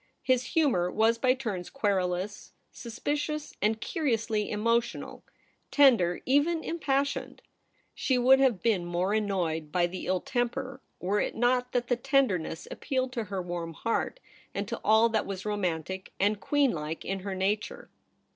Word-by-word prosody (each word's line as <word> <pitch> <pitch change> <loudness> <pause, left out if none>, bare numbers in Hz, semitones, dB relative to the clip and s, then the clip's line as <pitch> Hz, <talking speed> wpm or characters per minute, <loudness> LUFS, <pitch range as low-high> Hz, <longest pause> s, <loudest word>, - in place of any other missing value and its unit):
His 255 +3 +1
humour 255 - +3
was 225 +4 +2
by 255 +1 +3
turns 210 -9 -4
querulous, 195 -4 -1 0.2
suspicious, 290 +5 -3
and 215 +1 +1
curiously 230 - -1
emotional 230 +3 -1 0.2
— - - -39
tender, 235 -12 +4
even 300 +5 +2
impas 280 -5 +1
sioned. 280 - -6 0.5
She 260 - +1
would 260 +2 +6
have 255 -8 +2
been 215 -6 +2
more 175 +3 -1
annoyed 175 -8 -1
by 175 +1 +2
the 180 +2 -5
ill 185 0 +1
temper, 255 +2 -2 0.2
were 200 +3 0
it - - -2
not 250 +1 +1
that 245 -1 0
the 245 - +1
tender 270 -6 +2
ness 160 0 -7
appealed 260 -2 -2
to 230 -4 -2
her 195 -2 -4
warm 175 -1 -4
heart, 230 - -2 0.4
and - - -2
to - - -4
all 220 +2 +5
that 220 -2 0
was 195 0 -5
romantic 190 -3 -2
and 205 +1 +2
queen 285 0 +2
like 155 0 -5
in 195 0 -2
her 195 0 -4
nature. 210 - -2
220 Hz, 160 wpm, -29 LUFS, 185-260 Hz, 0.5 s, would